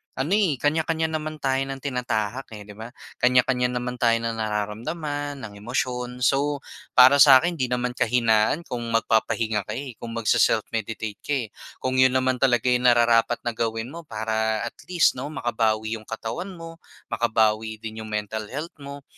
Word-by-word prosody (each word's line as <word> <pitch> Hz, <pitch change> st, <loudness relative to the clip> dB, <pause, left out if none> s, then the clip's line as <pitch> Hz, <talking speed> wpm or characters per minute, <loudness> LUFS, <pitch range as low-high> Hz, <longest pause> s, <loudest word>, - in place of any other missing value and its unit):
ano, 135 Hz, +6 st, -2 dB
eh, 200 Hz, -7 st, +3 dB
kanya-kanya 160 Hz, +3 st, 0 dB
naman 155 Hz, 0 st, -3 dB
tayo 135 Hz, -1 st, +1 dB
ng 135 Hz, -, -4 dB
tinatahak, 125 Hz, -3 st, -2 dB
eh, 105 Hz, -, -9 dB
'di 105 Hz, -, -12 dB
ba? 110 Hz, +2 st, -9 dB, 0.3 s
Kanya-kanya 125 Hz, 0 st, +3 dB
naman 125 Hz, 0 st, -4 dB
tayo 115 Hz, -2 st, +4 dB
ng 115 Hz, -1 st, -3 dB
nararamdaman, 140 Hz, +7 st, -3 dB
ng 100 Hz, -2 st, -9 dB
emosyon, 125 Hz, +2 st, -3 dB
so, 140 Hz, +2 st, +1 dB, 0.3 s
para 130 Hz, +3 st, +8 dB
sa 135 Hz, -1 st, +9 dB
akin 170 Hz, +5 st, +2 dB
'di 130 Hz, -, +1 dB
naman 125 Hz, 0 st, -1 dB
kahinaan 115 Hz, +4 st, +2 dB
kung 125 Hz, -6 st, -5 dB, 0.2 s
magpapahinga 110 Hz, -2 st, +1 dB
ka, -, -, -4 dB
eh, 135 Hz, -1 st, -5 dB
kung 115 Hz, -1 st, -7 dB
magse-self-meditate 110 Hz, -1 st, 0 dB
ka, 145 Hz, -, -2 dB
eh, 125 Hz, -5 st, -2 dB, 0.4 s
kung 130 Hz, 0 st, 0 dB
'yon 130 Hz, 0 st, +5 dB
naman 130 Hz, -1 st, +1 dB
talaga 120 Hz, -4 st, +3 dB
'yong 125 Hz, 0 st, +3 dB
nararapat 120 Hz, 0 st, +3 dB
na 120 Hz, -, -1 dB
gawin 115 Hz, +1 st, -3 dB
mo. 165 Hz, 0 st, -10 dB
Para 110 Hz, 0 st, -1 dB
at 115 Hz, -, -4 dB, 0.2 s
least 175 Hz, -7 st, +2 dB
'no 135 Hz, -, -4 dB
makabawi 110 Hz, -5 st, -1 dB
'yong 110 Hz, -, -18 dB
katawan 115 Hz, -, -5 dB
mo, 165 Hz, -1 st, -10 dB, 0.3 s
makabawi 110 Hz, -1 st, +1 dB
din 110 Hz, 0 st, -6 dB
'yong 110 Hz, -, -7 dB
mental 105 Hz, 0 st, -4 dB
health 150 Hz, +9 st, -5 dB
mo, 140 Hz, 0 st, -9 dB
125 Hz, 170 wpm, -24 LUFS, 110-140 Hz, 0.4 s, sa